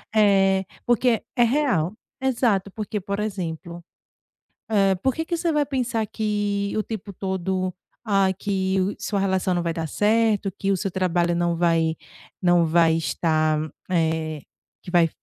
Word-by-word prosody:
eh, 195 -2 +4 0.2
porque 240 -1 +2
é 240 - +4
real, 235 - +1 0.3
exato 230 -7 +1
porque, 215 0 -4
por 200 +1 -4
exemplo, 175 -4 -4 0.9
eh, 195 -3 +3
por 260 +7 0
que 320 - -2
que 340 +1 -2
você 335 0 0
vai 295 -1 +2
pensar 250 -5 -1
que 205 -2 -1
o 215 - +1
tempo 210 -2 -6
todo, 190 -1 -2 0.3
ah, 195 -3 +3
que 190 -1 0
o 190 +2 0
sua 200 -2 -2
relação 190 -1 +1
não 175 - 0
vai 170 -1 -1
dar 165 -1 -3
certo, 210 0 +2
que 195 0 +1
o - - +2
seu 195 +2 -2
trabalho 175 -2 +1
não 175 0 +1
vai 165 -1 +2 0.5
não 175 -2 +4
vai 165 0 +4
estar, 155 -1 +1 0.3
eh, 160 -3 0 0.4
que 180 - -9
vai 175 -2 +4
195 Hz, 160 wpm, -24 LUFS, 175-215 Hz, 0.9 s, eh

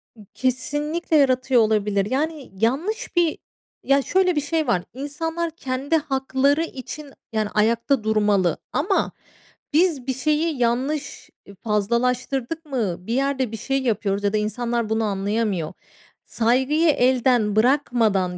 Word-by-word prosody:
I 215 -2 -15
kesinlikle 295 +6 -1
yaratıyor 255 -3 +3
olabilir. 210 -2 +1
Yani, 300 +1 -2
yanlış 275 - -1
bir 340 -2 +2 0.5
Ya, 275 +1 +4
şöyle 365 +4 +2
bir 295 - +1
şey 310 +1 -1
var. 210 -7 +2
İnsanlar 325 +5 -3
kendi 270 +1 -2
hakları 275 0 +1
için, 285 -1 -8 0.2
yani, 215 -1 0
ayakta 230 +4 +1
durmalı 210 -5 +2 0.2
ama 375 +7 +1 0.6
biz 310 -5 +2
bir 260 - +1
şeyi 305 +4 0
yanlış 265 +5 -1 0.2
i 200 - -13
fazlalaştırdık 245 - -1
mı, 235 - -1
bir 230 - -1
yerde 265 -2 0
bir 225 - -5
şey 270 +5 -1
yapıyoruz 205 -4 0
ya 200 0 +1
da - - +2
insanlar 230 +2 -1
bunu 220 0 +1
anlayamıyor. 200 -3 -1 0.5
Saygıyı 265 +8 +2
elden 250 -5 +3
bırakmadan 220 -7 +2
255 Hz, 130 wpm, -23 LUFS, 220-290 Hz, 0.6 s, Ya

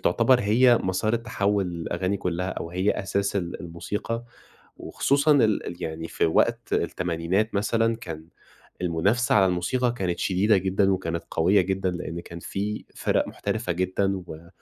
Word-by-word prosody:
تعتبر 120 +7 +3
هي 120 +3 +5
مسار 95 +4 0
التحوّل 100 -4 0
للأغاني 85 +2 -2
كلها، 90 0 -2
أو 85 - -5
هي 95 +4 +1
أساس 100 0 -1
ال 85 -2 -3
الموسيقى، 105 +7 -4 0.5
وخصوصًا 140 +2 +2
ال 115 -7 +3
ال 90 +1 -7
يعني 80 0 -4
في - - +1
وقت 80 - +1
التمانينات 90 +5 0
مثلًا، 115 +3 +1
كان 80 -6 -8 0.5
المنافسة 95 +8 +1
على 100 -2 +6
الموسيقى 105 +8 0
كانت 90 -6 -2
شديدة 100 +3 +3
جدًا، 95 +1 +2
وكانت 85 -2 -3
قوية 95 +5 +4
جدًا، 95 0 -1
لإن 85 -1 -5
كان 85 0 -9
في 105 +4 -4
فِرَق - - +1
محترفة 90 - -3
جدًا، 95 +2 0
و 80 +2 -10
95 Hz, 150 wpm, -25 LUFS, 85-105 Hz, 0.5 s, على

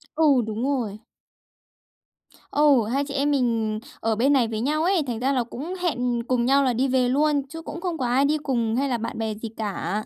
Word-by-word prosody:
Ừ, 295 -6 +4
đúng 220 +3 -3
rồi. 240 -7 -1 1.5
Ừ, 285 -6 +4
hai 280 +1 +1
chị 280 - -6
em 285 +1 +1
mình 230 -5 0 0.2
ở 225 -1 0
bên 270 +6 +3
này 245 -4 +3
với 220 -1 -3
nhau 305 +4 0
ấy, 360 -3 +2
thành 230 -2 -3
ra 265 +2 +1
là 250 -2 +1
cũng 290 +9 -7
hẹn 245 -8 0
cùng 245 -1 0
nhau 275 +2 +4
là 255 -2 +2
đi 260 +4 +1
về 255 -1 +2
luôn, 290 +1 +2
chứ 325 +1 -7
cũng 335 +1 -7
không 350 -3 -2
có 255 - -2
ai 260 +3 +3
đi 305 +2 +2
cùng 235 -6 -1
hay 275 +1 0
là 240 - 0
bạn 230 0 -5
bè 220 -1 -2
gì 225 +1 -6
cả. 205 -1 -3
255 Hz, 225 wpm, -24 LUFS, 230-285 Hz, 1.5 s, Ừ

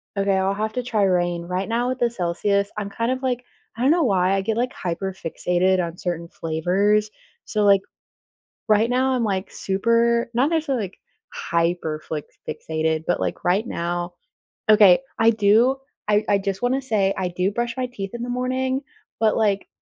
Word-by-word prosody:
Okay, 195 -1 +1
I'll 190 +1 +1
have 215 +2 -2
to 250 - -2
try 225 -4 0
Reign. 175 -2 +1
Right 180 +2 -2
now 240 +2 0
with 255 - -3
the 240 - +2
Celsius, 200 0 0
I'm 205 -1 -3
kind 230 +4 -1
of 260 0 -2
like 250 -2 -1 0.3
I 230 - -6
don't 265 +3 +4
know 340 0 +3
why 190 -6 +2
I 195 - +1
get 220 +3 -2
like 250 +2 0
hyper-fixated 180 0 -1
on 170 +1 -8
certain 170 -2 -3
flavors, 195 +7 +1 0.3
so, 210 -1 0
like, 200 -1 +6 0.9
right 215 +2 +4
now 260 +1 +2
I'm, 245 -2 0
like, 195 -2 -2
super 230 +4 +1
not 255 +4 +3
necessarily 280 -9 0
like 190 - -10 0.4
hyper-fli 165 -3 -2 0.3
fixated, 160 +1 -2
but 175 - 0
like - - -3
right 195 +6 +2
now 175 -2 -3 0.5
okay, 210 -4 +7 0.2
I 225 - +5
do 225 +4 +4 0.3
I 210 0 +3
I 200 - +4
just 195 +1 -3
wanna 260 +2 +1
say 205 -6 +1
I 185 -1 -1
do 180 +2 -1
brush 235 +2 -2
my 255 -1 -1
teeth 195 -6 -6
in 235 - -5
the 245 - -4
morning, 255 +1 -1 0.4
but, 220 -1 +3
like, 205 -3 +1
200 Hz, 180 wpm, -23 LUFS, 180-235 Hz, 0.9 s, okay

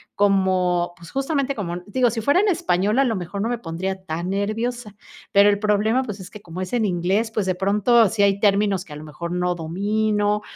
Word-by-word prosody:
como, 185 -3 +2
pues, 170 0 -13
justamente 275 0 -1
como 175 -5 -4
digo, 245 +3 +2
si 225 - -3
fuera 285 - +3
en 420 - +2
español, 215 - +1
a 275 - +4
lo 230 -4 0
mejor 185 +2 -5
no 220 - 0
me 240 -2 -2
pondría 190 +1 -4
tan 170 0 -4
nerviosa, 215 +2 -2 0.4
pero 200 +1 +6
el 205 0 +1
problema, 215 +4 +1
pues, 210 -5 -6
es 185 0 -9
que 210 - -12
como 175 -1 -9
es 185 +3 -5
en 240 -2 +1
inglés, 195 +4 0
pues, 215 -3 -1
de 185 -1 0
pronto, 205 +3 +3
sí 210 -2 +1
hay 200 0 +2
términos 200 -2 +2
que 180 - -17
a - - -7
lo 155 - -10
mejor 170 +3 -7
no 180 0 0
domino 205 +5 0
200 Hz, 220 wpm, -22 LUFS, 180-220 Hz, 0.4 s, pero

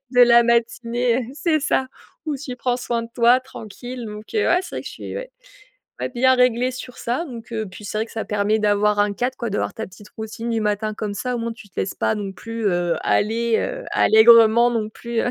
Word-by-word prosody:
de 245 - +7
la 235 -1 +7
matinée 235 +1 +1 0.2
et - - -10
c'est 310 +1 +1
ça 270 -2 0 0.4
où 305 -2 -1
tu 265 -2 -6
prends 245 0 -1
soin 240 -2 -2
de 230 - -10
toi 240 +1 +4
tranquille 245 0 -8
donc 210 0 -8
heu, 430 - +2
ouais 350 - +4
c'est - - -9
vrai - - -3
que - - -8
je - - -9
suis - - -7
ouais, - - -6 0.7
ouais, - - -1
bien 260 +1 +3
réglée 250 0 +3
sur 255 -1 -9
ça 245 +8 -2
donc 235 -7 -9
heu 220 -1 -2
puis 185 +3 -12
c'est 215 - -3
vrai 220 - -1
que - - -15
ça 225 - -3
permet 210 +1 +1
d'avoir 210 0 +2
un 205 0 +2
cadre 250 +5 -2
quoi, 235 - -3
d'avoir 205 - -1
ta 220 - -5
petite 205 +3 -15
routine 225 +1 -5
du 225 -1 0
matin 210 0 -1
comme 210 -1 -4
ça, 250 +5 -3
au - - -3
moins, 230 0 -3
tu 220 -2 -14
te - - -4
laisses 190 - -3
pas - - 0
non 205 -2 -4
plus, 230 +2 -5
heu, 175 -2 0
aller, 225 +2 +1
heu, - - -3
allègrement 230 +1 +6
non 225 -3 -1
plus, 235 +1 -3
heu - - 0
230 Hz, 245 wpm, -22 LUFS, 215-250 Hz, 0.7 s, de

